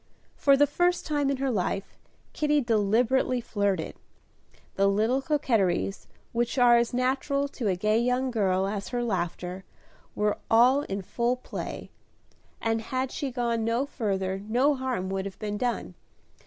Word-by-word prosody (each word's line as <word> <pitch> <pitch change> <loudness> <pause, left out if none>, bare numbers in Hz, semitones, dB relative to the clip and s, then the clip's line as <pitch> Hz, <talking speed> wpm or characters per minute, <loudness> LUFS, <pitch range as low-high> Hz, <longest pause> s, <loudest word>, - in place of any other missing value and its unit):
For 275 -1 +4
the 290 - +6
first 350 +5 +1
time 290 -2 0
in 275 - 0
her 270 0 0
life, 195 -2 -2 0.4
Kitty 300 -1 +2
deliberately 235 +3 +2
flirted. 200 -7 -1 0.8
The 195 0 +2
little 220 +7 +2
coquetries, 225 - 0 0.2
which 240 +2 -1
are 245 -1 +6
as 235 0 +1
natural 265 +3 0
to 245 -5 -4
a 190 - +2
gay 215 +4 +2
young 250 +2 +1
girl 190 -4 +1
as 200 0 -3
her 245 -1 -2
laughter, 180 -3 -3 0.5
were 210 0 0
all 250 +5 +5
in 195 -7 -4
full 240 +6 0
play, 255 - -7 0.7
and 225 0 0
had 255 +3 -2
she 285 -3 -3
gone 235 -2 -1
no 230 +4 +1
further 195 -8 -2
no 255 +6 +3
harm 260 -8 -2
would 195 0 -2
have 195 - -7
been 210 -1 -4
done. 245 -1 -2
235 Hz, 155 wpm, -27 LUFS, 200-260 Hz, 0.8 s, the